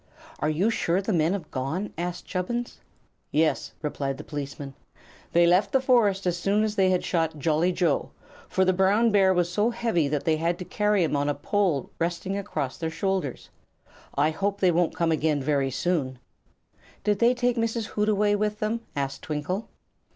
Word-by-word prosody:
"Are 150 Hz, -, 0 dB
you 180 Hz, +9 st, +1 dB
sure 175 Hz, -4 st, +1 dB
the 195 Hz, +2 st, -1 dB
men 165 Hz, +1 st, +2 dB
have 185 Hz, -6 st, -5 dB
gone?" 145 Hz, +10 st, -3 dB
asked 175 Hz, +1 st, -4 dB
Chubbins. 235 Hz, +6 st, -3 dB, 0.5 s
"Yes," 155 Hz, +1 st, +1 dB
replied 140 Hz, -2 st, -2 dB
the -, -, -8 dB
policeman; 140 Hz, -1 st, -6 dB, 0.6 s
"they 170 Hz, 0 st, +5 dB
left 180 Hz, +3 st, +3 dB
the 265 Hz, -, +4 dB
forest 225 Hz, -7 st, +3 dB
as 175 Hz, -1 st, +1 dB
soon 200 Hz, +4 st, +2 dB
as 215 Hz, -1 st, 0 dB
they 190 Hz, -2 st, +3 dB
had 185 Hz, -1 st, +1 dB
shot 165 Hz, -3 st, 0 dB
Jolly 160 Hz, +4 st, +2 dB
Joe, 175 Hz, -5 st, 0 dB, 0.4 s
for 190 Hz, -, +2 dB
the 185 Hz, -, +3 dB
brown 200 Hz, +5 st, +3 dB
bear 195 Hz, -2 st, +5 dB
was 175 Hz, -1 st, +1 dB
so 210 Hz, +5 st, +2 dB
heavy 230 Hz, -10 st, 0 dB
that 145 Hz, 0 st, -1 dB
they 160 Hz, -1 st, +2 dB
had 170 Hz, +2 st, 0 dB
to 180 Hz, -, -7 dB
carry 210 Hz, -1 st, +1 dB
him 155 Hz, -, 0 dB
on 145 Hz, 0 st, +1 dB
a 145 Hz, -, 0 dB
pole 170 Hz, -3 st, 0 dB
resting 175 Hz, +3 st, -2 dB
across 165 Hz, -9 st, -3 dB
their 165 Hz, -2 st, -2 dB
shoulders. 190 Hz, -, -3 dB, 0.6 s
I 150 Hz, +3 st, +3 dB
hope 200 Hz, +5 st, -2 dB
they 185 Hz, -2 st, +4 dB
won't 175 Hz, 0 st, +1 dB
come 165 Hz, -1 st, +1 dB
again 155 Hz, -1 st, +1 dB
very 140 Hz, -1 st, +1 dB
soon." 135 Hz, -2 st, -1 dB, 0.9 s
"Did 205 Hz, -1 st, +1 dB
they 240 Hz, +2 st, +4 dB
take 245 Hz, 0 st, +1 dB
Mrs. 230 Hz, -1 st, -1 dB
Hootaway 210 Hz, -1 st, +2 dB
with 210 Hz, 0 st, 0 dB
them?" 220 Hz, +2 st, -2 dB
asked 140 Hz, -1 st, -3 dB
Twinkle. 170 Hz, +8 st, -3 dB
180 Hz, 185 wpm, -26 LUFS, 155-205 Hz, 0.9 s, they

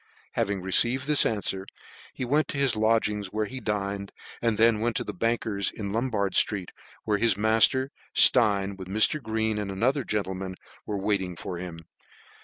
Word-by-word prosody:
Having 100 Hz, -2 st, -2 dB
received 120 Hz, +8 st, +2 dB
this 150 Hz, 0 st, +4 dB
anfwer, 95 Hz, -3 st, -1 dB, 0.4 s
he 130 Hz, -, -5 dB
went 150 Hz, +5 st, +1 dB
to -, -, -5 dB
his 135 Hz, -4 st, +2 dB
lodgings, 110 Hz, -2 st, +1 dB
where 105 Hz, +3 st, -2 dB
he 130 Hz, +5 st, -7 dB
dined, 100 Hz, -3 st, -3 dB, 0.3 s
and 115 Hz, -2 st, 0 dB
then 115 Hz, -1 st, +4 dB
went 115 Hz, 0 st, -1 dB
to -, -, 0 dB
the 105 Hz, -, -6 dB
banker's 110 Hz, -1 st, -1 dB
in 100 Hz, -2 st, -6 dB
Lombard 110 Hz, -3 st, -1 dB
ftreet, 95 Hz, -4 st, +1 dB, 0.3 s
where 105 Hz, -2 st, 0 dB
his 115 Hz, -4 st, +2 dB
mailer 115 Hz, +5 st, +3 dB, 0.2 s
Stein, 100 Hz, -5 st, +5 dB
with 95 Hz, -1 st, -9 dB
Mr. 110 Hz, +10 st, +2 dB
Green 110 Hz, -1 st, -1 dB
and 105 Hz, -1 st, -4 dB
another 125 Hz, +9 st, 0 dB
gentleman/ 95 Hz, -3 st, -3 dB, 0.3 s
were 105 Hz, -, -2 dB
wailing 95 Hz, -3 st, -1 dB
for 85 Hz, +2 st, -6 dB
him. 85 Hz, -2 st, -8 dB
105 Hz, 170 wpm, -26 LUFS, 100-115 Hz, 0.4 s, Stein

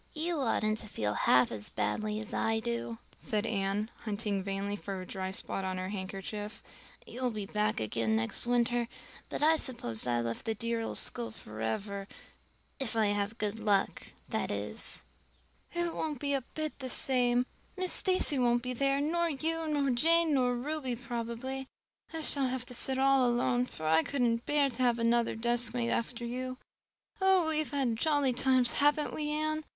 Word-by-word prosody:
"You 325 Hz, +1 st, -1 dB
oughtn't 220 Hz, -4 st, +1 dB
to 215 Hz, -, -6 dB
feel 105 Hz, -, -2 dB
half 125 Hz, +4 st, +4 dB
as 105 Hz, -2 st, -4 dB
badly 215 Hz, 0 st, -1 dB
as 220 Hz, -, -5 dB
I 225 Hz, 0 st, +1 dB
do," 235 Hz, 0 st, -3 dB, 0.2 s
said 210 Hz, 0 st, -1 dB
Anne, 205 Hz, 0 st, -1 dB
hunting 205 Hz, -2 st, -1 dB
vainly 195 Hz, +1 st, -2 dB
for 195 Hz, -2 st, -5 dB
a 185 Hz, -, -6 dB
dry 190 Hz, 0 st, -3 dB
spot 190 Hz, 0 st, -2 dB
on 185 Hz, -1 st, -2 dB
her 185 Hz, 0 st, -3 dB
handkerchief. 200 Hz, +2 st, -5 dB, 0.4 s
"You'll 250 Hz, 0 st, -2 dB
be 215 Hz, -3 st, -4 dB
back 210 Hz, +1 st, 0 dB
again 110 Hz, 0 st, 0 dB
next 110 Hz, -, 0 dB
winter, 240 Hz, 0 st, +2 dB, 0.4 s
but -, -, -2 dB
I 320 Hz, +1 st, +6 dB
suppose 125 Hz, -, -2 dB
I've 120 Hz, -1 st, +1 dB
left 115 Hz, 0 st, -4 dB
the 225 Hz, -, -1 dB
dear 230 Hz, +1 st, -1 dB
old 225 Hz, -, -4 dB
school 115 Hz, -1 st, -3 dB
forever 115 Hz, -, -4 dB, 0.7 s
if 260 Hz, -4 st, -1 dB
I 220 Hz, -2 st, +3 dB
have 205 Hz, +2 st, -1 dB
good 210 Hz, +1 st, -2 dB
luck, 205 Hz, -3 st, +1 dB, 0.2 s
that -, -, -2 dB
is." -, -, -1 dB, 0.7 s
"It 345 Hz, -1 st, 0 dB
won't 305 Hz, -2 st, -2 dB
be 285 Hz, +1 st, 0 dB
a 275 Hz, -, +1 dB
bit 310 Hz, -2 st, -3 dB
the 260 Hz, -1 st, -5 dB
same. 245 Hz, -1 st, +2 dB, 0.3 s
Miss 370 Hz, -1 st, +2 dB
Stacy 370 Hz, -7 st, +3 dB
won't 240 Hz, -1 st, +3 dB
be 250 Hz, 0 st, -2 dB
there, 275 Hz, +2 st, +2 dB
nor 335 Hz, +4 st, +1 dB
you 320 Hz, +2 st, -1 dB
nor 285 Hz, -3 st, +1 dB
Jane 325 Hz, +5 st, +4 dB
nor 250 Hz, -2 st, +3 dB
Ruby 265 Hz, 0 st, -2 dB
probably. 240 Hz, +2 st, -4 dB, 0.4 s
I 325 Hz, -1 st, -4 dB
shall 280 Hz, -3 st, +3 dB
have 255 Hz, 0 st, -2 dB
to 250 Hz, -, -6 dB
sit 260 Hz, +2 st, +1 dB
all 270 Hz, -2 st, +4 dB
alone, 245 Hz, +1 st, +2 dB
for 155 Hz, -, -7 dB
I 160 Hz, +1 st, +5 dB
couldn't 240 Hz, 0 st, 0 dB
bear 290 Hz, -2 st, +3 dB
to 245 Hz, +2 st, -4 dB
have 240 Hz, -2 st, +3 dB
another 235 Hz, 0 st, +2 dB
deskmate 240 Hz, +1 st, +1 dB
after 235 Hz, +1 st, -2 dB
you. 255 Hz, +2 st, -4 dB, 0.6 s
Oh, 380 Hz, -3 st, +5 dB
we 310 Hz, -1 st, +3 dB
have 310 Hz, -, -1 dB
had 260 Hz, -6 st, 0 dB
jolly 290 Hz, -1 st, +2 dB
times, 255 Hz, -1 st, +3 dB
haven't 295 Hz, +1 st, +3 dB
we, 300 Hz, -1 st, -2 dB
Anne? 310 Hz, +1 st, -1 dB
240 Hz, 180 wpm, -31 LUFS, 210-275 Hz, 0.7 s, I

